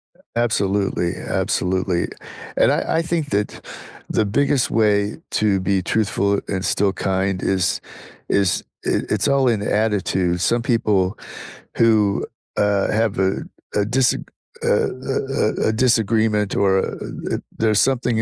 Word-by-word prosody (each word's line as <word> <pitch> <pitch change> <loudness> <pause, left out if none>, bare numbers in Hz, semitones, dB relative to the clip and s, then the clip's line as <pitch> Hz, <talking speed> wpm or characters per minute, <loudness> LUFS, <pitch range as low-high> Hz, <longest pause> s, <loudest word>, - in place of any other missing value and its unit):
A - - -9
absolutely, 100 -6 0
absolutely, 90 -1 -1 0.5
and - - +4
I - - 0
I - - +2
think 165 -3 -2
that 105 +1 -2 0.4
the 110 - +1
biggest 140 +4 +1
way 105 -2 +2 0.2
to 100 -3 +2
be 95 0 0
truthful 100 0 +1
and 95 -1 -2
still 100 -1 +2
kind 95 -1 -1
is 95 -2 +1 0.5
is 100 -3 +2 0.2
i - - +1
it's 105 +3 +1
all 135 -2 +3
in 110 -4 +1
attitude. 100 -5 0
Some 115 +6 +1
people 115 -5 +2 0.8
who, 110 -3 +3 0.3
uh, 105 -1 +2
have 110 -1 0
a 95 0 +3 0.4
a 105 - +3
disag 130 -1 +2 0.4
a - - +1 0.4
a - - 0 0.3
a 105 - 0
a 110 - 0
disagreement 110 -3 +2
or 95 -1 +3
a - - -2 0.4
a - - -3 0.2
there's 110 -2 +3
something 120 -4 +1
105 Hz, 140 wpm, -21 LUFS, 95-115 Hz, 0.8 s, and